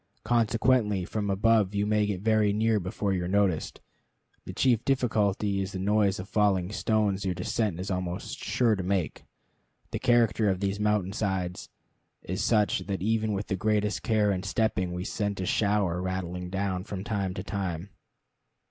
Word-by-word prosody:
Consequently 115 -3 +2
from 105 +1 -3
above 105 0 +2
you 100 0 +1
may 105 0 +2
get 95 -3 -3
very 110 -1 +3
near 110 0 +2
before 95 +2 -2
you 90 -2 -1
are - - -3
noticed. 95 -4 0 0.6
The - - -6
chief 120 -3 +2
difficulty 105 -6 +1
is 95 +1 -4
the - - -3
noise 100 0 +2
of 95 - -6
falling 100 -4 +1
stones 105 -2 0
your 95 -2 -1
descent 90 +1 -1
is 95 +2 -4
almost 90 -1 -4
sure 115 -3 +1
to 95 - -3
make. 95 -2 -2 0.7
The - - -2
character 115 -3 +3
of 95 -1 0
these 100 +1 -1
mountain 105 -2 +1
sides 95 -4 -2 0.5
is 95 +1 -3
such 105 -3 +2
that 95 -2 -3
even 110 0 +1
with 100 +1 -2
the 95 - -2
greatest 105 +1 0
care 110 -3 +2
in 95 -2 -1
stepping 100 -2 0
we 90 +1 -4
sent 100 0 -2
a 95 - -2
shower 100 -4 +1
rattling 90 -1 -4
down 95 -1 -2
from 95 -1 -6
time 100 -4 -2
to - - -4
time. 95 -2 -4
100 Hz, 175 wpm, -28 LUFS, 95-110 Hz, 0.7 s, very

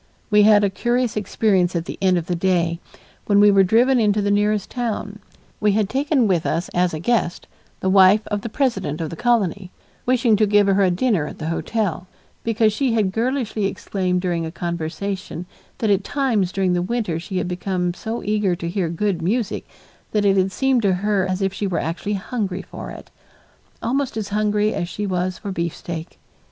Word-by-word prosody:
We 210 0 +6
had 210 0 +6
a 200 - +2
curious 240 +3 0
experience 195 -3 +1
at 170 -1 -1
the - - -7
end 185 -2 +3
of 170 - -2
the 180 - -2
day, 170 -2 +1 0.5
when 205 -1 +4
we 205 0 +7
were 195 -1 +5
driven 240 +7 +4
into 210 -2 +2
the 205 0 +1
nearest 205 0 +1
town. 215 -4 -3 0.4
We 210 -1 +2
had 210 -1 +1
taken 275 -2 +1
with 175 -4 +1
us 170 - -1
as 180 -2 0
a - - -4
guest 180 -2 0 0.4
the - - -1
wife 195 +2 +5
of 205 -1 -1
the 230 - -5
president 220 - -1
of 160 -2 -3
the - - -5
colony, 200 -4 0 0.4
wishing 245 -3 +3
to 215 0 +3
give 205 0 +4
her 195 0 +3
a 190 - +4
dinner 180 -4 +1
at - - -8
the 160 0 -4
hotel, 185 0 -2 0.4
because 225 -1 +2
she 255 +1 0
had 210 -4 +1
girlishly 230 -1 -1
exclaimed 185 -2 -2
during 175 -2 -1
a 160 - -4
conversation 175 +2 -4 0.3
that 220 -2 +1
at 195 0 +2
times 230 -11 0
during 190 -2 +1
the 175 - +1
winter 185 -4 -2
she 185 +3 -5
had 180 - -1
become 180 0 -2
so 225 +5 -5
eager 205 -3 +1
to 170 -1 -5
hear 180 -2 -1
good 175 +1 -1
music 210 +5 -1 0.5
that 210 -1 +2
it 195 -1 +4
had 190 0 +2
seemed 265 +3 +1
to 200 -3 +2
her 195 0 0
as 185 +1 -1
if 195 -1 0
she 200 +1 -2
were 180 - -1
actually 170 +6 -2
hungry 195 -2 -3
for - - -8
it, - - -11 0.7
almost 265 0 -1
as 210 -2 -3
hungry 210 0 +1
as 175 -3 -3
she 210 - -4
was 185 -1 -1
for 205 - -7
a - - -3
beefsteak. 170 -1 -5
200 Hz, 205 wpm, -21 LUFS, 180-215 Hz, 0.7 s, we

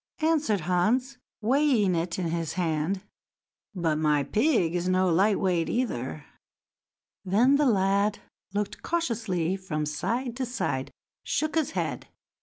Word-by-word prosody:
answered 305 - +2
Hans, 225 - +1 0.2
weighing 245 -5 +3
it 170 0 -1
in 175 -3 -1
his 165 -1 -2
hand; 175 +2 -1 0.7
"but 165 -4 0
my 150 -2 +2
pig 215 - +2
is 180 +1 -1
no 185 0 +3
light 195 +4 +3
weight, 180 -3 +1
either." 130 - -2 1.0
Then 235 +9 +4
the 295 -1 +3
lad 200 -1 +2 0.3
looked 205 +1 -3
cautiously 225 - -1
about 190 -1 -7
from 150 -1 -1
side 230 - -2
to 265 - -1
side, 245 - -2
and - - -19 0.3
shook 310 0 -1
his 320 -4 0
head. - - -2
195 Hz, 140 wpm, -27 LUFS, 170-245 Hz, 1.0 s, Then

